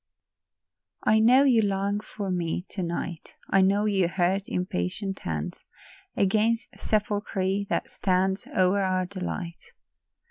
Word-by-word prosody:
I 220 Hz, -, +4 dB
know 250 Hz, +5 st, +6 dB
you 250 Hz, -5 st, +5 dB
long 200 Hz, 0 st, 0 dB
for 205 Hz, -2 st, -5 dB
me 175 Hz, 0 st, -2 dB
to 195 Hz, -, -5 dB
night; 170 Hz, -1 st, -4 dB, 0.2 s
I 195 Hz, -, +5 dB
know 200 Hz, +2 st, +3 dB
you 195 Hz, -4 st, +2 dB
hurt 185 Hz, +2 st, 0 dB
impatient 180 Hz, -, -2 dB
hands 80 Hz, -2 st, -4 dB, 0.5 s
Against 220 Hz, +4 st, +1 dB
the -, -, -19 dB
sepulchre 205 Hz, -2 st, -1 dB
that -, -, -1 dB
stands 190 Hz, +1 st, 0 dB
O'er 190 Hz, +2 st, +2 dB
our 185 Hz, -1 st, +1 dB
delight. 180 Hz, -2 st, -6 dB
195 Hz, 130 wpm, -26 LUFS, 180-205 Hz, 0.5 s, know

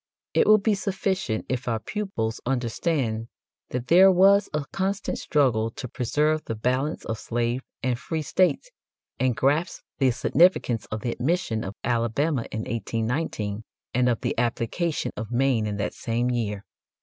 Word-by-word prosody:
It -, -, +3 dB
will 215 Hz, 0 st, +8 dB
be 215 Hz, +1 st, +1 dB
sufficient 190 Hz, -, -1 dB
if 130 Hz, -1 st, -3 dB
our 115 Hz, -2 st, +1 dB
pupils 115 Hz, -, -3 dB
understand 120 Hz, -2 st, -1 dB, 0.4 s
that 125 Hz, -1 st, -3 dB
there 185 Hz, +7 st, +7 dB
was 195 Hz, +2 st, +5 dB
a 150 Hz, -1 st, -2 dB
constant 195 Hz, +1 st, -2 dB
struggle 125 Hz, -7 st, +2 dB
to 140 Hz, -3 st, -5 dB
preserve 150 Hz, +6 st, 0 dB
the 115 Hz, -, -3 dB
balance 130 Hz, +7 st, -1 dB
of 115 Hz, -1 st, -3 dB
slave 120 Hz, +2 st, -1 dB, 0.2 s
and 125 Hz, -2 st, 0 dB
free 160 Hz, +2 st, -3 dB
states, 185 Hz, -, +1 dB, 0.5 s
and 130 Hz, -2 st, +2 dB
grasp 150 Hz, +6 st, +1 dB, 0.2 s
the 135 Hz, -2 st, +4 dB
significance 125 Hz, -, +2 dB
of 110 Hz, 0 st, -5 dB
the 120 Hz, -, -1 dB
admission 125 Hz, -5 st, -1 dB
of 95 Hz, +2 st, -6 dB
Alabama 120 Hz, +3 st, 0 dB
in 110 Hz, -, -3 dB
1819 115 Hz, -1 st, -2 dB, 0.3 s
and 125 Hz, 0 st, +3 dB
of 120 Hz, -, 0 dB
the -, -, -1 dB
application 120 Hz, +8 st, -1 dB
of 110 Hz, -1 st, -5 dB
Maine 120 Hz, -3 st, +1 dB
in 105 Hz, -1 st, -3 dB
that 105 Hz, -, -2 dB
same 120 Hz, +2 st, -1 dB
year. 105 Hz, -4 st, -2 dB
125 Hz, 155 wpm, -25 LUFS, 115-160 Hz, 0.5 s, will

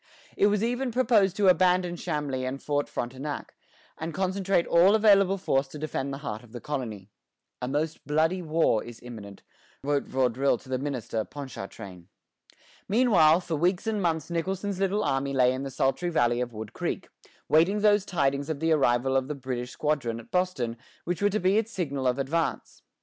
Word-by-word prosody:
It 200 Hz, -, +4 dB
was 210 Hz, 0 st, +1 dB
even 245 Hz, +3 st, 0 dB
proposed 220 Hz, -6 st, +3 dB
to 200 Hz, -1 st, +2 dB
abandon 180 Hz, -1 st, +3 dB
Chambly 150 Hz, -6 st, -3 dB
and 130 Hz, +2 st, -3 dB
Fort 145 Hz, 0 st, -1 dB
Frontenac, 130 Hz, +4 st, -5 dB, 0.5 s
and 160 Hz, 0 st, -5 dB
concentrate 190 Hz, -1 st, +1 dB
all 180 Hz, +5 st, +5 dB
available 200 Hz, -3 st, +5 dB
force 135 Hz, -7 st, 0 dB
to 145 Hz, -, -10 dB
defend 140 Hz, -2 st, -3 dB
the 135 Hz, -, -4 dB
heart 110 Hz, -2 st, -4 dB
of 120 Hz, -2 st, -18 dB
the 120 Hz, -, -6 dB
colony. 110 Hz, -9 st, -5 dB, 0.5 s
"A 125 Hz, -, -2 dB
most 150 Hz, +4 st, -2 dB
bloody 160 Hz, +5 st, +1 dB
war 160 Hz, -9 st, +1 dB
is 120 Hz, -1 st, -10 dB
imminent," 105 Hz, -5 st, -10 dB, 0.4 s
wrote 145 Hz, 0 st, 0 dB
Vaudreuil 130 Hz, 0 st, +1 dB
to 130 Hz, -, -17 dB
the 130 Hz, -1 st, -1 dB
minister, 125 Hz, -5 st, -3 dB
Ponchartrain. 100 Hz, -10 st, -9 dB, 0.8 s
Meanwhile, 190 Hz, -8 st, +5 dB
for 170 Hz, -2 st, -3 dB
weeks 175 Hz, +6 st, +1 dB
and 220 Hz, -2 st, -1 dB
months 165 Hz, -2 st, -1 dB
Nicholson's 190 Hz, +3 st, -2 dB
little 195 Hz, +2 st, +1 dB
army 135 Hz, -2 st, 0 dB
lay 130 Hz, -1 st, +4 dB
in 130 Hz, -, -4 dB
the 135 Hz, -, -4 dB
sultry 135 Hz, +6 st, 0 dB
valley 120 Hz, -6 st, +2 dB
of 125 Hz, -1 st, -3 dB
Wood 110 Hz, -1 st, -8 dB
Creek, -, -, -3 dB, 0.4 s
waiting 175 Hz, +7 st, +3 dB
those 205 Hz, -1 st, +4 dB
tidings 140 Hz, -5 st, 0 dB
of 155 Hz, -3 st, -2 dB
the 160 Hz, +1 st, +1 dB
arrival 130 Hz, -3 st, +2 dB
of 130 Hz, -1 st, +1 dB
the 150 Hz, -, -4 dB
British 125 Hz, -2 st, -4 dB
squadron 130 Hz, -5 st, -1 dB
at 115 Hz, -, -14 dB
Boston 165 Hz, -11 st, -1 dB, 0.3 s
which 175 Hz, 0 st, -3 dB
were 205 Hz, -, +4 dB
to 210 Hz, +2 st, 0 dB
be 190 Hz, +4 st, +3 dB
its 225 Hz, 0 st, -4 dB
signal 140 Hz, -, -2 dB
of 125 Hz, +1 st, +1 dB
advance. 155 Hz, +5 st, -2 dB
150 Hz, 180 wpm, -27 LUFS, 130-185 Hz, 0.8 s, all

